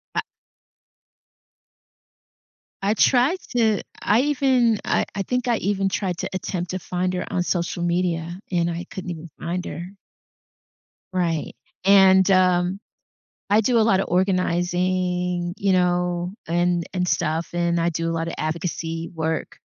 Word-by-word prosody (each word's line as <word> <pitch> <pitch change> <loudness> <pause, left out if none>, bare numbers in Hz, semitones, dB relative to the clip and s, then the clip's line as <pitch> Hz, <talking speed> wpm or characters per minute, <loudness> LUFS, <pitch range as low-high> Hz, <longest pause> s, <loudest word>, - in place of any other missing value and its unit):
I - - +2 2.6
I 200 +2 +2
tried 265 - +3 0.2
to 220 -3 +3 0.2
I 215 +4 +3
even 260 -6 +2
I - - +1
I 200 - -1
think 250 +4 -2
I 235 - +2
even 195 -1 0
tried 185 -2 -2
to - - -3
attempt 180 -1 -3
to 185 - -3
find 180 +1 -2
her 180 - -2
on 180 - 0
social 175 -1 -1
media, 175 0 -1
and 170 -1 +1
I 170 +1 -4
couldn't 185 -1 -6
even 165 0 -8
find 180 +2 -3
her. 175 +3 -7 1.2
Right. 170 -4 -1 0.3
And, 190 -1 +6
um, 185 0 +3 0.7
I 210 +2 +5
do 240 +2 +2
a - - +5
lotta 195 -3 +3
organizing, 180 -1 0
you 195 -1 +2
know, 180 0 +1
and 175 0 +1
and 180 -1 0
stuff, 160 0 0
and 170 0 +1
I 170 +1 +2
do 165 0 -2
a 165 - -1
lotta 165 0 -3
advocacy 165 +1 -3
work, 160 0 -3
180 Hz, 140 wpm, -23 LUFS, 170-195 Hz, 2.6 s, And